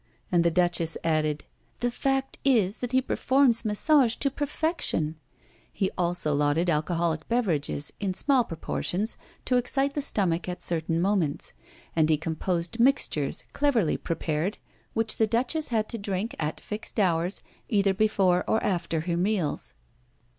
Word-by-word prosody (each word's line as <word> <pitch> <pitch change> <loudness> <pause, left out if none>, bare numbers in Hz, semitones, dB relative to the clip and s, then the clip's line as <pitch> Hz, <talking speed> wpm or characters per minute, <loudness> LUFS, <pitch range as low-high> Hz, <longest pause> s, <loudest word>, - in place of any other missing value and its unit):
And 175 -2 +4
the 170 - +4
Duchess 170 -1 +1
added: 155 -2 0 0.3
"The 245 0 0
fact 270 +2 -1
is 220 -7 +2
that 245 -1 -3
he 260 0 +3
performs 260 -3 +3
massage 240 +3 +3
to 275 - 0
perfection." 290 - -1 0.6
He 190 - -1
also 175 -4 0
lauded 145 +4 +2
alcoholic 160 0 -1
beverages, 170 - 0
in 195 -3 -2
small 270 +1 +3
proportions 185 +3 -1 0.3
to 250 - +3
excite 270 +3 0
the 290 - -1
stomach 185 -9 0
at 180 - -6
certain 165 -1 0
moments; 180 -6 0 0.4
and 160 -1 +3
he 155 - +4
composed 170 +5 -2
mixtures, 235 - +2
cleverly 255 - +2
prepared, 165 +3 -2 0.4
which 225 -1 +1
the 220 - +3
Duchess 250 +8 0
had 220 -3 0
to 230 - -5
drink, 200 +3 -3
at 150 0 -2
fixed 215 +1 -6
hours, 175 -1 +1 0.3
either 200 -2 +3
before 190 -3 +2
or 220 - +3
after 170 -4 -1
her 170 +1 -2
meals. 180 -4 -1
190 Hz, 145 wpm, -27 LUFS, 165-240 Hz, 0.6 s, And